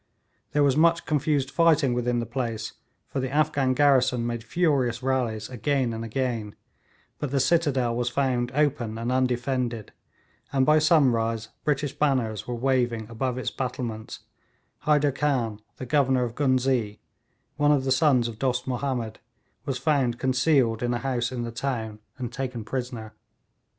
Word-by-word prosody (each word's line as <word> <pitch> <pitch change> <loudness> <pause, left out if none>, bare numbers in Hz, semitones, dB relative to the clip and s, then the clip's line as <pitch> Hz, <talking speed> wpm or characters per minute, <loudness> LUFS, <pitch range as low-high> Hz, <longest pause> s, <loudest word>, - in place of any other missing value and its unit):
There 145 - +3
was 140 -2 +3
much 170 +2 +3
confused 145 -2 0
fighting 150 -4 +3
within 120 0 0
the 120 - -1
place, 115 -2 -4 0.3
for 140 - -4
the 130 0 -2
Afghan 145 -3 +1
garrison 130 -3 +3
made 120 -1 -3
furious 130 -4 0
rallies 120 -5 -1
again 130 0 -1
and 115 0 -5
again; 115 -3 -3 0.6
but 145 - -2
the 140 +1 0
citadel 135 -6 +2
was 120 0 0
found 125 -2 0
open 125 -7 0
and 115 +2 -2
undefended, 125 -2 -1 0.6
and 135 -1 +2
by 155 +2 +5
sunrise 115 -8 +2
British 145 -1 0
banners 125 -8 0
were 120 - -3
waving 120 -3 0
above 125 +2 -2
its 130 - -2
battlements 120 -4 -5 0.6
Hyder 150 -1 +2
Khan, 125 -7 -1 0.2
the 130 - -6
Governor 130 -1 +2
of 120 -2 -3
Ghuznee, 130 -5 +1 0.6
one 145 0 +4
of 140 -3 +3
the 135 - -1
sons 130 -3 +3
of 110 -2 -8
Dost 125 -1 0
Mahomed, 125 -3 -2 0.5
was 135 -2 -2
found 135 -3 +1
concealed 130 -3 +2
in 120 0 0
a - - 0
house 120 -1 -1
in 125 -2 -3
the 120 - -4
town 115 -4 -3 0.2
and 125 -3 -5
taken 125 -3 -4
prisoner. 120 -2 -5
130 Hz, 155 wpm, -26 LUFS, 120-140 Hz, 0.6 s, by